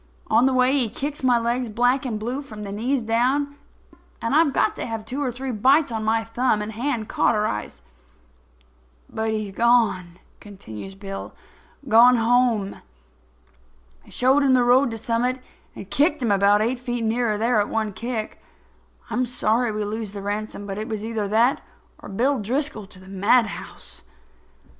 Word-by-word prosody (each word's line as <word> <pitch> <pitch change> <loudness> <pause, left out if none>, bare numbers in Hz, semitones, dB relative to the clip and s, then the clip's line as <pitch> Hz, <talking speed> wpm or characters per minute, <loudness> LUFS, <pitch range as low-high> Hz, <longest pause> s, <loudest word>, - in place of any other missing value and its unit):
On 255 - +5
the 265 - +1
way 255 0 +4
he 260 -6 +1
kicks 285 +7 -4
my 250 -2 +4
legs 235 +1 -1
black 245 +5 +1
and 215 -3 -3
blue 245 +6 -3
from 215 -7 -9
the 200 - -6
knees 240 +5 -1
down; 260 +6 0 0.6
and 230 - -2
I've 310 -1 +4
got - - +1
to - - -4
have 225 -2 -5
two 265 +5 -4
or 265 -3 -1
three 260 +2 -5
bites 265 +6 +3
on 220 -1 -3
my 225 +1 +1
thumb 225 0 0
and 210 +1 -4
hand 230 -1 -2
cauterized. 105 - -1 1.3
"But 220 0 -3
he's 215 -2 -2
gone"—continues 195 - -2
Bill—"gone 230 +5 +1
home. 230 -3 +2 1.3
I - - -20
showed 265 +3 +3
him 270 -2 +4
the 250 - +4
road 250 +2 +4
to 225 - -5
Summit 240 +3 -1 0.4
and - - -9
kicked 295 - +2
him 230 - +1
about 200 +1 +4
eight 240 +3 -1
feet 245 -1 -3
nearer 225 -1 0
there 225 +1 +2
at 205 - -3
one 220 -2 -2
kick. 230 +1 -5 0.7
I'm 245 +3 0
sorry 240 -1 +1
we 210 0 -3
lose 215 -1 -5
the 200 -1 -7
ransom; 205 0 -4
but 200 0 -5
it 215 - -4
was 215 -1 -4
either 220 -2 -2
that 230 +6 +2 0.4
or - - -11
Bill 255 +7 +1
Driscoll 235 0 -3
to 190 - -14
the 185 - -15
madhouse." 205 +4 -1
230 Hz, 165 wpm, -23 LUFS, 210-250 Hz, 1.3 s, On